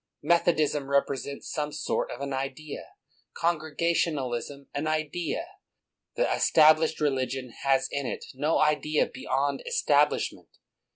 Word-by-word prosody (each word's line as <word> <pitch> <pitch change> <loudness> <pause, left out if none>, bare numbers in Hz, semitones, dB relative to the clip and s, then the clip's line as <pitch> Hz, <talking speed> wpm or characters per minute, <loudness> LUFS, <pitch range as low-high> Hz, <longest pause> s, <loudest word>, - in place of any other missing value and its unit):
Method 170 +1 +3
ism 145 -2 0
represents 140 0 -1
some 150 0 -2
sort - - -2
of 130 - -7
an 140 -1 -3
idea, 135 +3 -5 0.5
Congrega 165 0 0
tionalism 140 -3 -2
an 145 +2 -2
idea; 155 - -2 0.7
the - - +2
Established 155 0 +5
Religion 130 -3 -1
has 135 -1 +3
in 140 -2 -2
it - - -5
no 150 +5 +1
idea 150 0 +2
beyond 140 +1 -2
establishment. 145 0 +1
145 Hz, 120 wpm, -27 LUFS, 140-155 Hz, 0.7 s, Established